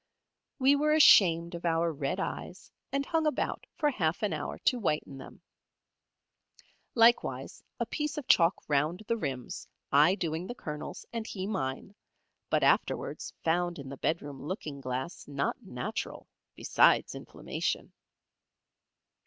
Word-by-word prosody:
We 275 Hz, 0 st, +5 dB
were 300 Hz, +2 st, +2 dB
ashamed 170 Hz, -, +6 dB
of 170 Hz, -, -6 dB
our 165 Hz, -1 st, +1 dB
red 140 Hz, -2 st, -2 dB
eyes, -, -, -5 dB, 0.2 s
and 275 Hz, 0 st, 0 dB
hung 320 Hz, 0 st, +1 dB
about 300 Hz, -, -2 dB
for 300 Hz, -3 st, +2 dB
half 175 Hz, -, -1 dB
an 210 Hz, -, +1 dB
hour -, -, -4 dB
to 250 Hz, -, +1 dB
whiten 150 Hz, -8 st, -2 dB
them. -, -, -12 dB, 1.5 s
Likewise 235 Hz, 0 st, +3 dB, 0.2 s
a -, -, 0 dB
piece 300 Hz, 0 st, -3 dB
of 295 Hz, -, -5 dB
chalk 170 Hz, +1 st, +4 dB
round 155 Hz, +7 st, +1 dB
the 230 Hz, -, 0 dB
rims, 135 Hz, -, -5 dB, 0.2 s
I 150 Hz, +7 st, +6 dB
doing 165 Hz, -1 st, -3 dB
the 245 Hz, -, -6 dB
Colonel's, 150 Hz, -9 st, -7 dB
and 230 Hz, -1 st, -3 dB
he 190 Hz, -2 st, -4 dB
mine, 190 Hz, -3 st, -3 dB, 0.6 s
but -, -, +2 dB
afterwards -, -, +1 dB
found 175 Hz, +1 st, +1 dB
in 140 Hz, -2 st, -8 dB
the 140 Hz, -, -6 dB
bedroom 145 Hz, -4 st, -2 dB
looking 150 Hz, -4 st, -5 dB
glass 130 Hz, +6 st, -4 dB
not 145 Hz, -, -2 dB
natural, 215 Hz, +1 st, -5 dB, 0.3 s
besides -, -, +3 dB
inflammation. -, -, -4 dB
175 Hz, 135 wpm, -30 LUFS, 150-230 Hz, 1.5 s, ashamed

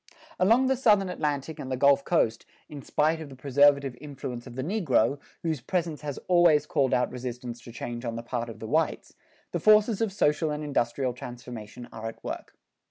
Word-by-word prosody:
Along 230 Hz, +8 st, +4 dB
the 265 Hz, +1 st, +2 dB
Southern 210 Hz, -7 st, +3 dB
Atlantic 150 Hz, -3 st, -2 dB
and 130 Hz, -, -6 dB
the 130 Hz, -, -1 dB
Gulf 140 Hz, +1 st, +4 dB
coast, 115 Hz, -10 st, +1 dB, 0.2 s
in 145 Hz, -2 st, -9 dB
spite 160 Hz, +4 st, +1 dB
of 155 Hz, -, -8 dB
the 135 Hz, -, -11 dB
preservative 140 Hz, 0 st, +3 dB
influence 135 Hz, -4 st, -7 dB
of 120 Hz, -, -10 dB
the 130 Hz, -, -3 dB
negro, 145 Hz, -, +1 dB, 0.2 s
whose 160 Hz, -6 st, -1 dB
presence 165 Hz, +1 st, -2 dB
has 145 Hz, -2 st, -5 dB
always 175 Hz, -5 st, +5 dB
called 135 Hz, -3 st, +1 dB
out 125 Hz, 0 st, +1 dB
resistance 125 Hz, -1 st, -6 dB
to 120 Hz, -, -11 dB
change 120 Hz, +1 st, -6 dB
on 115 Hz, -2 st, -3 dB
the 115 Hz, -, -5 dB
part 120 Hz, -1 st, -3 dB
of 115 Hz, -, -8 dB
the 110 Hz, -, -7 dB
whites, 160 Hz, +7 st, 0 dB, 0.4 s
the -, -, -1 dB
forces 215 Hz, 0 st, +4 dB
of 225 Hz, -3 st, +1 dB
social 155 Hz, -4 st, +1 dB
and 150 Hz, 0 st, -3 dB
industrial 130 Hz, -2 st, 0 dB
transformation 120 Hz, -1 st, -9 dB
are 110 Hz, 0 st, -6 dB
at 115 Hz, -, -9 dB
work. -, -, -6 dB
140 Hz, 195 wpm, -27 LUFS, 125-160 Hz, 0.4 s, always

